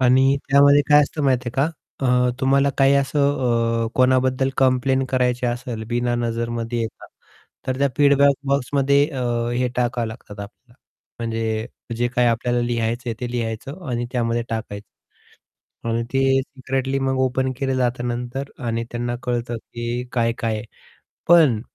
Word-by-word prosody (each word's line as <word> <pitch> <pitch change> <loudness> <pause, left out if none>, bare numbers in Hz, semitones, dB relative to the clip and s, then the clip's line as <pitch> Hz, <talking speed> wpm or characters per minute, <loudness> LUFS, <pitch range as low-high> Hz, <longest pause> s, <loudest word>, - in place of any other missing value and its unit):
आणि 130 +2 +4
त्यामध्ये 140 +1 +6
काय 150 0 +7
असतं 150 +2 -3
माहिती 125 -2 +1
आहे - - -4 0.5
का, 125 -1 +3
अ, - - +2
तुम्हाला 140 +1 +3
काही 135 0 +5
असं 130 -5 +1
अ, - - -1
कोणाबद्दल 130 +1 +2
कंप्लेंट 130 0 +2
करायची 125 -1 +1
असेल 120 -2 -3
बिना 120 0 0
नजरमध्ये 115 0 -2
येता 115 - -6 0.6
तर 130 0 -1
त्या 140 0 +3
फीडबॅक 140 -1 +5
बॉक्समध्ये 140 +1 +2
अ, 130 -4 -4 0.3
हे 125 +1 +1
टाकावे 120 -1 0
लागतात 110 -2 -10
आपल्याला 115 +4 -11 0.5
म्हणजे 115 -1 -2 0.3
जे 120 +1 +1
काही 120 0 +2
आपल्याला 120 +1 +1
लिहायचं 120 0 -1
आहे, 115 - -3
ते 120 -1 -4
लिहायचं 125 - -4
आणि 120 -1 -1
त्यामध्ये 120 -2 0
टाकायचं. 105 -3 -8 0.7
आणि 115 +1 0
ते 135 0 +3
सिक्रेटली 135 0 -3
मग 135 -1 0
ओपन 130 0 +1
केले 135 -1 -1
जात 125 -1 0
नंतर 120 +3 -4 0.2
आणि 115 0 -1
त्यांना 120 0 -3
कळतं 120 -1 -2 0.2
की 120 +1 -3
काय-काय 115 -2 0
आहे 105 - -7 0.6
पण 155 -10 +6
125 Hz, 150 wpm, -22 LUFS, 120-135 Hz, 0.7 s, काय